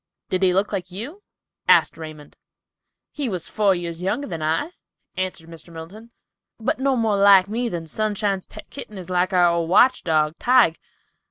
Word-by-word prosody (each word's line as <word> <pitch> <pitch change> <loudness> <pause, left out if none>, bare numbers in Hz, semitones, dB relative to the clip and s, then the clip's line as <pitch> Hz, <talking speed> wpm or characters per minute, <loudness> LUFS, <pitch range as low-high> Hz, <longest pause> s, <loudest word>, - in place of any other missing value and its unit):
"Did 185 - 0
he 185 -1 +4
look 195 +3 0
like 185 -3 -3
you?" 240 - -7 0.5
said - - +5
Raymond. 155 -2 -10 0.8
"He 285 -4 -3
was 180 -5 -3
four 200 -3 +2
years 170 -1 -5
younger 215 +10 -1
than 165 - -6
I," 160 - -1 0.4
answered 185 -3 -4
Mr. 165 0 -11
Middleton, 180 +8 -10 0.5
"but 235 +3 -1
no 270 0 +1
more 220 -4 +1
like 195 -1 +6
me 235 +3 -2
than 170 -5 -5
Sunshine's 205 +1 -2
pet - - -13
kitten 215 -7 -9
is 185 -1 -8
like 180 +1 +1
our 180 -2 +4
old 170 -1 -1
watch 255 +8 +4
dog, 155 -1 +1
Tige. 245 -10 +4
185 Hz, 175 wpm, -22 LUFS, 170-220 Hz, 0.8 s, like